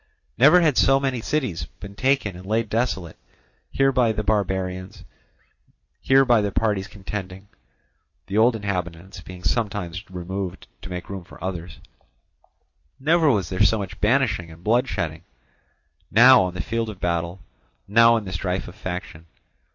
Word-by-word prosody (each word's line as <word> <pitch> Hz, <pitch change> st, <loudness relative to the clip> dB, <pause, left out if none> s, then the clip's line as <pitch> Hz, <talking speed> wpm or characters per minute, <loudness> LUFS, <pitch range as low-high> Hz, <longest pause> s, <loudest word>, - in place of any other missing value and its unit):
Never 155 Hz, -, +6 dB
had 155 Hz, -6 st, +3 dB
so 135 Hz, 0 st, +4 dB
many 135 Hz, -3 st, -2 dB
cities 110 Hz, -, -2 dB
been 100 Hz, -1 st, -9 dB
taken 130 Hz, -4 st, 0 dB
and 90 Hz, -, -10 dB
laid 110 Hz, +3 st, -1 dB
desolate, 100 Hz, -8 st, -2 dB, 0.5 s
here 135 Hz, 0 st, +3 dB
by 125 Hz, -4 st, +2 dB
the 110 Hz, 0 st, -3 dB
barbarians, 95 Hz, -3 st, -2 dB, 1.0 s
here 135 Hz, 0 st, +4 dB
by 120 Hz, -3 st, +4 dB
the 100 Hz, -1 st, -1 dB
parties 105 Hz, -2 st, 0 dB
contending 100 Hz, -1 st, -7 dB, 0.8 s
(the 95 Hz, -, -6 dB
old 115 Hz, +2 st, +4 dB
inhabitants 95 Hz, -3 st, -5 dB
being 90 Hz, 0 st, -11 dB
sometimes 100 Hz, -6 st, -2 dB
removed 95 Hz, +1 st, -5 dB, 0.2 s
to 95 Hz, -, -9 dB
make 90 Hz, -1 st, -6 dB
room 95 Hz, -2 st, -6 dB
for -, -, -15 dB
others); 90 Hz, -3 st, -5 dB, 1.2 s
never 160 Hz, +2 st, +3 dB
was 100 Hz, -, +1 dB
there 95 Hz, -, -2 dB
so 110 Hz, -, +4 dB
much 95 Hz, -2 st, -7 dB
banishing 105 Hz, -7 st, +1 dB
and 80 Hz, +1 st, -14 dB
blood 120 Hz, +5 st, +2 dB
shedding, 85 Hz, -6 st, -4 dB, 0.9 s
now 125 Hz, +3 st, +7 dB
on 90 Hz, -1 st, -2 dB
the 90 Hz, -, -3 dB
field 115 Hz, +4 st, -2 dB
of 100 Hz, -4 st, -9 dB
battle, 85 Hz, +1 st, -2 dB, 0.4 s
now 115 Hz, +3 st, +5 dB
in 110 Hz, -, -4 dB
the 95 Hz, -, -6 dB
strife 90 Hz, +1 st, -2 dB
of -, -, -10 dB
faction. 90 Hz, -4 st, -7 dB
100 Hz, 155 wpm, -23 LUFS, 90-115 Hz, 1.2 s, now